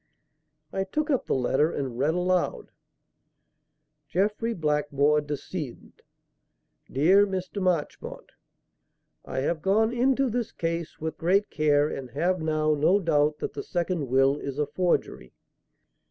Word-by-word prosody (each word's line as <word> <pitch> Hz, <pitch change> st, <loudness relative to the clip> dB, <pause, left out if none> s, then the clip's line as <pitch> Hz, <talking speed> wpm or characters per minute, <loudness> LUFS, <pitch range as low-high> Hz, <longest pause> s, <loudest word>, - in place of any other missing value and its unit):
I 195 Hz, -, 0 dB
took 300 Hz, -, -2 dB
up 265 Hz, -, 0 dB
the -, -, +1 dB
letter 135 Hz, +5 st, +2 dB
and 130 Hz, -4 st, -4 dB
read 150 Hz, +5 st, +2 dB
aloud: 180 Hz, 0 st, 0 dB, 1.4 s
"JEFFREY 210 Hz, +7 st, 0 dB
BLACKMORE, 150 Hz, -1 st, +1 dB
DECD. 145 Hz, -1 st, -6 dB, 1.0 s
"DEAR 190 Hz, +9 st, +5 dB
MR. 190 Hz, +1 st, -4 dB
MARCHMONT, 180 Hz, -5 st, -2 dB, 0.9 s
"I 130 Hz, -, -3 dB
have 155 Hz, +3 st, -1 dB
gone 220 Hz, +6 st, +2 dB
into 265 Hz, +2 st, +2 dB
this 240 Hz, -1 st, -2 dB
case 165 Hz, -1 st, -4 dB
with 160 Hz, 0 st, -5 dB
great 195 Hz, +5 st, +2 dB
care 150 Hz, -1 st, +3 dB
and 135 Hz, -4 st, -6 dB
have 175 Hz, +7 st, 0 dB
now 155 Hz, -1 st, +1 dB
no 155 Hz, +7 st, +3 dB
doubt 150 Hz, -4 st, +2 dB
that -, -, -3 dB
the -, -, -4 dB
second 175 Hz, -4 st, -2 dB
will 135 Hz, +3 st, +3 dB
is 140 Hz, 0 st, -5 dB
a 150 Hz, -, +1 dB
forgery. 170 Hz, -, -1 dB
160 Hz, 130 wpm, -26 LUFS, 145-190 Hz, 1.4 s, DEAR